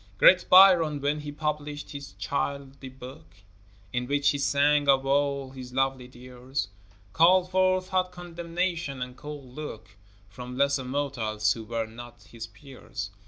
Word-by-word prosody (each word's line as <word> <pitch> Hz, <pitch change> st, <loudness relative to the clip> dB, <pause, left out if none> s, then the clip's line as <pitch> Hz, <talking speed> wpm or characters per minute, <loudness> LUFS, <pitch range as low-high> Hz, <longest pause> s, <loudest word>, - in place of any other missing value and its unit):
Great 180 Hz, -, +6 dB
Byron, 180 Hz, -6 st, +7 dB
when 145 Hz, +2 st, -1 dB
he 150 Hz, 0 st, -6 dB
published 150 Hz, -1 st, -4 dB
his 140 Hz, -1 st, -8 dB
Childe 140 Hz, -1 st, -4 dB, 0.2 s
book, 135 Hz, -, -12 dB, 0.6 s
In 125 Hz, 0 st, -2 dB
which 145 Hz, +1 st, +2 dB
he 145 Hz, -, -3 dB
sang 145 Hz, +1 st, +2 dB
of 135 Hz, -1 st, +4 dB
all 140 Hz, -1 st, 0 dB
his 130 Hz, -2 st, -10 dB
lovely 135 Hz, -1 st, 0 dB
dears, 125 Hz, -1 st, -6 dB, 0.4 s
Called 180 Hz, +2 st, +4 dB
forth 185 Hz, 0 st, +2 dB
hot 185 Hz, -1 st, 0 dB
condemnation 170 Hz, -5 st, -3 dB
and 125 Hz, 0 st, -9 dB
cold 145 Hz, -4 st, -9 dB
look, 150 Hz, -6 st, -8 dB, 0.4 s
From 125 Hz, +5 st, -9 dB
lesser 140 Hz, -1 st, +1 dB
mortals 115 Hz, -6 st, -1 dB
who 115 Hz, -, -8 dB
were 115 Hz, 0 st, -2 dB
not 120 Hz, +2 st, -12 dB
his 115 Hz, -1 st, -9 dB
peers. 110 Hz, -4 st, -9 dB
140 Hz, 145 wpm, -27 LUFS, 125-150 Hz, 0.6 s, Byron